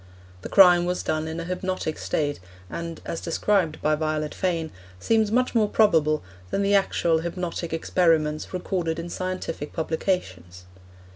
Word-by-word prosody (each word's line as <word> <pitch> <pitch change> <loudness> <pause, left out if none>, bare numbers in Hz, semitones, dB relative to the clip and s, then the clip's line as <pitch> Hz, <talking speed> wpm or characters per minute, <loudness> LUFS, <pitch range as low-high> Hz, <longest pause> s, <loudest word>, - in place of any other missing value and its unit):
The - - -7
crime 180 -3 +7
was 180 0 -2
done 155 0 -1
in 160 +1 -4
a - - -3
hypnotic 185 -2 -3
state, 145 -2 -1 0.3
and, 170 -1 -5
as 165 - -4
described 170 -1 0
by 155 - +3
Violet 155 0 -1
Fane, 165 -4 -1 0.3
seems 220 - +2
much 250 +2 +2
more 215 -3 +3
probable 160 -8 +3 0.3
than 200 - 0
the 200 +1 +2
actual 170 -4 +2
hypnotic 170 0 -4
experiments 160 -2 +1
recorded 175 -3 -2
in 170 +1 -6
scientific 185 -5 -4
publications. 95 - -3
170 Hz, 145 wpm, -25 LUFS, 155-185 Hz, 0.3 s, crime